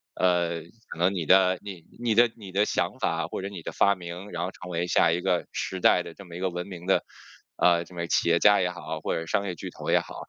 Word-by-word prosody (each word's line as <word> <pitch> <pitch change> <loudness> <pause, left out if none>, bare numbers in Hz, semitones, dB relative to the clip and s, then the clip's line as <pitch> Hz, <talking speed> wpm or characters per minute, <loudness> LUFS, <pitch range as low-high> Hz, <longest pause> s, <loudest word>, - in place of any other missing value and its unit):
呃， 85 -2 +1 0.3
可 - - -8
能 90 +3 +3
你 90 -4 -2
的 95 +2 +5
你 95 -5 -9 0.2
你 120 -3 0
的 120 +1 +6
你 100 -4 -10
的 100 +3 +2
想 - - -1
法 - - -1
或 - - -5
者 100 - -4
你 95 -4 -8
的 - - -6
发 100 - +3
明， 90 +2 -8
然 85 0 -3
后 90 - -3
成 90 - -11
为 85 +1 -1
下 85 - +4
一 85 - 0
个 90 0 0
时 95 - -3
代 90 - +5
的 85 - -9
这 100 - -13
么 85 -2 -11
一 - - -6
个 95 0 0
闻 90 +1 -5
名 90 -3 -9
的， 95 - +2 0.5
呃， 85 -1 +3
什 90 - -16
么 85 -1 -3
企 85 - +2
业 85 0 +4
家 105 0 +6
也 90 - +1
好 80 -3 -6
或 - - -1
者 80 - -3
商 100 +4 0
业 90 -3 -3
巨 - - -7
头 - - -7
也 - - +5
好。 - - -9
90 Hz, 295 characters per minute, -26 LUFS, 85-95 Hz, 0.5 s, 的